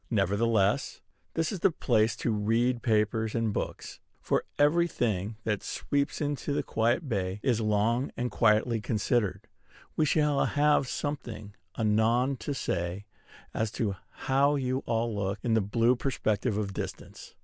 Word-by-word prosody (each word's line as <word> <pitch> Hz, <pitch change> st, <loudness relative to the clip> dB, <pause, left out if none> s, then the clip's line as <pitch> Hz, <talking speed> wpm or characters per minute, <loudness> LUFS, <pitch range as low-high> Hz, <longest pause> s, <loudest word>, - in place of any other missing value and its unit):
Nevertheless, 105 Hz, +3 st, +1 dB, 0.4 s
this 165 Hz, -1 st, 0 dB
is 195 Hz, -, -4 dB
the 195 Hz, -, +4 dB
place 115 Hz, -8 st, +1 dB
to 115 Hz, -, -1 dB
read 115 Hz, +4 st, +1 dB
papers 110 Hz, 0 st, +1 dB
and 115 Hz, -2 st, 0 dB
books; -, -, -5 dB, 0.2 s
for -, -, 0 dB
every 165 Hz, +4 st, +4 dB
thing 110 Hz, -, -1 dB
that 105 Hz, -2 st, -1 dB
sweeps 140 Hz, 0 st, -2 dB
into 145 Hz, -1 st, -2 dB
this -, -, -1 dB
quiet 120 Hz, +8 st, +1 dB
bay 95 Hz, -4 st, -2 dB
is 120 Hz, -4 st, +2 dB
long 110 Hz, +4 st, +1 dB
and 125 Hz, 0 st, -2 dB
quietly 110 Hz, +1 st, +2 dB
considered. 105 Hz, -2 st, 0 dB, 0.5 s
We 155 Hz, -, +2 dB
shall 150 Hz, -1 st, +2 dB
have 145 Hz, -2 st, +2 dB
something 120 Hz, -8 st, -5 dB, 0.2 s
anon 115 Hz, +5 st, +2 dB
to 140 Hz, +5 st, -4 dB
say 90 Hz, -2 st, -3 dB, 0.5 s
as 110 Hz, 0 st, -1 dB
to 105 Hz, -6 st, -1 dB, 0.3 s
how 140 Hz, +2 st, +3 dB
you 130 Hz, -1 st, -1 dB
all 115 Hz, 0 st, 0 dB
look 100 Hz, 0 st, -2 dB
in 120 Hz, -, +1 dB
the 110 Hz, -, +4 dB
blue 115 Hz, +5 st, +2 dB
perspective 110 Hz, -4 st, -1 dB
of 100 Hz, -2 st, -2 dB
distance. -, -, -7 dB
115 Hz, 150 wpm, -29 LUFS, 105-135 Hz, 0.5 s, the